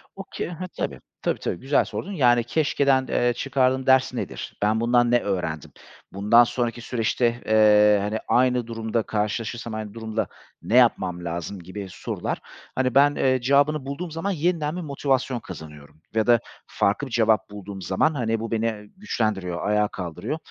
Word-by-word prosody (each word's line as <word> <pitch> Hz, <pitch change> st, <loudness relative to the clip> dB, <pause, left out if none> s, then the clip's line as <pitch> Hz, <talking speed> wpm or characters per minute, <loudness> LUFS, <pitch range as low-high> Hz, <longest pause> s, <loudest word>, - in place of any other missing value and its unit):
Okay, 195 Hz, -, -6 dB
ha 175 Hz, +2 st, -6 dB
tabii. -, -, -3 dB, 0.2 s
Tabii, -, -, -1 dB
tabii, 85 Hz, -, -3 dB
güzel 140 Hz, +2 st, +2 dB
sordun. 200 Hz, -, -5 dB
Yani 120 Hz, -9 st, +3 dB
keşkeden, 140 Hz, 0 st, +2 dB
eee, 120 Hz, 0 st, +2 dB
çıkardığım 130 Hz, 0 st, +1 dB
ders 130 Hz, -1 st, +4 dB
nedir? -, -, -6 dB
Ben 105 Hz, +2 st, +2 dB
bundan 120 Hz, 0 st, +3 dB
ne 120 Hz, -, +5 dB
öğrendim? 90 Hz, -, -3 dB, 0.4 s
Bundan 105 Hz, +5 st, +5 dB
sonraki 120 Hz, 0 st, -2 dB
süreçte, 120 Hz, 0 st, 0 dB
eee, 105 Hz, -1 st, +5 dB
hani 105 Hz, +2 st, -2 dB
aynı 125 Hz, -1 st, +2 dB
durumda 115 Hz, 0 st, -2 dB
karşılaşırsam, 110 Hz, +2 st, -3 dB
aynı 110 Hz, -1 st, -5 dB
durumla 110 Hz, -1 st, -3 dB, 0.3 s
ne 115 Hz, -, -1 dB
yapmam 90 Hz, -8 st, +3 dB
lazım 85 Hz, +4 st, -4 dB
gibi 95 Hz, +3 st, -7 dB
sorular 90 Hz, -, -4 dB, 0.4 s
hani 130 Hz, -1 st, 0 dB
ben, 145 Hz, +1 st, +5 dB
eee, 130 Hz, -1 st, +2 dB
cevabını 140 Hz, +2 st, +2 dB
bulduğum 160 Hz, +5 st, -5 dB
zaman 165 Hz, +6 st, -2 dB
yeniden 165 Hz, -2 st, 0 dB
bir 180 Hz, -, -4 dB
motivasyon 135 Hz, -4 st, -1 dB
kazanıyorum 75 Hz, -5 st, -11 dB
ya 110 Hz, 0 st, +1 dB
da 120 Hz, -1 st, +6 dB, 0.3 s
farklı 105 Hz, +8 st, 0 dB
bir -, -, -12 dB
cevap 110 Hz, -2 st, +2 dB
bulduğum 100 Hz, -1 st, -8 dB
zaman 95 Hz, -, +1 dB
hani 115 Hz, -5 st, -1 dB
bu 115 Hz, +1 st, -5 dB
beni, 115 Hz, 0 st, 0 dB
e, 110 Hz, -2 st, -3 dB
güçlendiriyor, 105 Hz, -, -2 dB
ayağa 105 Hz, 0 st, +2 dB
kaldırıyor. 90 Hz, -, -5 dB
115 Hz, 165 wpm, -24 LUFS, 105-130 Hz, 0.4 s, da